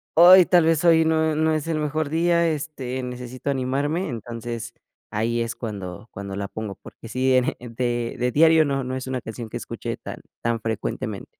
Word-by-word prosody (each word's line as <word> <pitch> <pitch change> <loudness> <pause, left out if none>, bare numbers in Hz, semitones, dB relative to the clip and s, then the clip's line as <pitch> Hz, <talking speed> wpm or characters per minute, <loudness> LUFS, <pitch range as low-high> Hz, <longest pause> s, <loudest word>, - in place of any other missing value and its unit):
ay, 180 +2 +9
tal 175 -3 +4
vez 165 -1 +2
hoy 160 -1 +6
no, 160 0 +2
eh, - - -2
no 160 0 +2
es 155 +1 -2
el 160 -2 0
mejor 150 0 -1
día, 170 +1 +2
este, 140 -5 -3
necesito 125 +2 -6
animarme, 140 +6 -1
entonces 115 0 -6 0.4
ahí 115 +2 0
es 115 0 -3
cuando 100 -2 -6
cuando 100 0 -6
la 100 0 -3
pongo, 105 -2 -6
porque 115 - -12
sí, 130 +2 +1
en, 125 -1 +4
eh, - - -1
de 120 0 -2
de 125 0 +1
diario 160 +2 +5
no 135 -1 -1
no 130 +1 -3
es 130 0 -5
una 130 -1 -2
canción 110 +1 -7
que - - -5
escuche - - -5
tan - - -8 0.2
tan 115 0 0
frecuentemente. 110 -1 -3
130 Hz, 200 wpm, -23 LUFS, 115-155 Hz, 0.4 s, ay